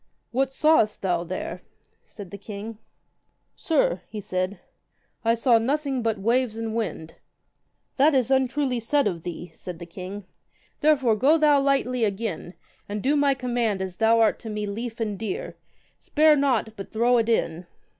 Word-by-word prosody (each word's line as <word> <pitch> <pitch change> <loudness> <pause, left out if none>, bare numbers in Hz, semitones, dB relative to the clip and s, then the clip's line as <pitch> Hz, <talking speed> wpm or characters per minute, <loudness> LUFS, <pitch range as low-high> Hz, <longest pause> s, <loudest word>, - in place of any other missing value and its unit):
What 265 +2 0
sawest 285 -9 +2
thou 175 -3 +1
there? 315 - -5 0.5
said 200 -5 -11
the 200 - -7
king. 210 +2 -8 0.8
Sir, 280 - +1
he 215 - -6
said, 185 0 -3 0.6
I 230 0 +3
saw 235 0 +4
nothing 275 +2 -1
but 225 -2 0
waves 230 +3 +1
and 225 -1 -3
winds. 200 -8 -4 0.8
That 290 +2 +5
is 260 -1 +2
untruly 265 -1 +1
said 280 +5 +1
of 175 -5 -1
thee, 175 +1 -7
said 180 -2 -8
the 170 - -8
king; 185 +3 -8 0.5
therefore 270 -7 +3
go 275 +9 +4
thou 300 -2 +4
lightly 260 -3 +1
again, 205 -3 -3 0.3
and 205 0 -4
do 285 +3 +2
my 285 -1 +3
command 240 -5 -1
as 190 -1 -5
thou 225 +1 +4
art 225 - +3
to 225 - -8
me 210 -1 -3
lief 225 +3 -5
and 210 -3 -2
dear, 210 -4 -4 0.4
spare 305 0 +4
not, 250 -6 +1
but 195 - -8
throw 240 +2 +3
it 230 0 0
in. 175 -6 0
230 Hz, 165 wpm, -25 LUFS, 200-265 Hz, 0.8 s, That